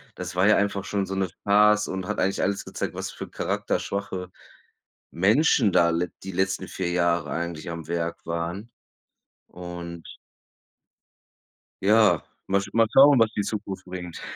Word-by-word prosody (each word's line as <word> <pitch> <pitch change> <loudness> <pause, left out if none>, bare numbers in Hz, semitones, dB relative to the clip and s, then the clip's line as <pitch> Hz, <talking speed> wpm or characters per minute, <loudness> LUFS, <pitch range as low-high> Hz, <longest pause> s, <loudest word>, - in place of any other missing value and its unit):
das 90 -2 -6
war 90 +2 +3
ja 105 - +6
einfach 100 -1 -1
schon 100 0 -1
so 95 - -5
'ne 95 -1 -1
Farce 105 +1 +4
und 95 -1 -4
hat - - -2
eigentlich 95 +1 0
alles 100 0 -1
gezeigt, - - -4
was - - -4
für - - -8
charakterschwache 95 -2 -3 0.8
Menschen 110 - +3
da 85 -1 +4
le 85 +1 -1
die 95 - -6
letzten 95 +1 -1
4 90 -2 -3
Jahre 85 -3 +1
eigentlich 85 -1 -4
am 85 -2 -6
Werk 85 0 -3
waren 85 +7 -4 0.8
und 85 -1 -8 1.8
Ja, 105 -4 +4 0.3
mal 100 +1 +2
sch 100 - -8
mal 115 0 +4
schauen, 140 -1 +7
was 115 -1 +4
die - - -1
Zukunft 100 -2 -5
bringt. 90 -2 -7
95 Hz, 155 wpm, -25 LUFS, 85-100 Hz, 1.8 s, schauen